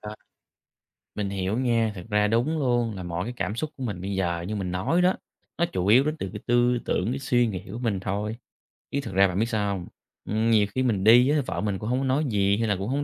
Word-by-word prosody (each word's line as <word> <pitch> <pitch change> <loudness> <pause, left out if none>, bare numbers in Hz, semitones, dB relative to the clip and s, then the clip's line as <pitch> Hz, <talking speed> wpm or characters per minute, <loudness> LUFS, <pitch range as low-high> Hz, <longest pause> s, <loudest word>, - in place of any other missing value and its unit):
À, 105 0 -7 1.0
mình 100 -2 -2
hiểu 100 +3 -2
nha. 115 -4 +1
Thực 90 +2 -9
ra 105 0 +3
đúng 120 +9 +1
luôn, 120 -5 +1
là 95 - -6
mỗi 90 +1 -3
cái 120 - -4
cảm 105 - -2
xúc 150 +5 -3
của 135 - -8
mình 100 -7 -4
bây 100 +2 -3
giờ, 85 -3 -1
như 105 - -3
mình 95 -3 -3
nói 95 - +1
đó, 185 +1 +4 0.4
nó 170 - +3
chủ 95 0 -1
yếu 120 +6 +6
đến 155 +1 -1
từ 95 - -4
cái 105 - -7
tư 120 0 +3
tưởng, 90 - 0
cái 135 - -3
suy 125 -2 +2
nghĩ 95 -5 -4
của 115 - -5
mình 115 -6 -1
thôi, 105 +3 -3 0.5
chứ 140 - -1
thực 95 - -7
ra, 95 +1 +5
bạn 90 +1 -3
biết 110 - +2
sao 105 -3 0
hông? 90 -2 -7 0.4
Ừm, 110 +2 +1
nhiều 105 -2 +4
khi 130 - +1
mình 105 -7 0
đi 120 +4 +7
á, 150 -1 +2
vợ - - -3
mình 100 -2 -1
cũng 105 - -5
hổng 125 - +1
có 135 - -1
nói 135 +4 +1
gì 100 -3 +2
hay 115 -1 0
là 100 - +1
cũng 95 +3 -4
hổng 135 +3 0
110 Hz, 270 wpm, -25 LUFS, 100-125 Hz, 1.0 s, đi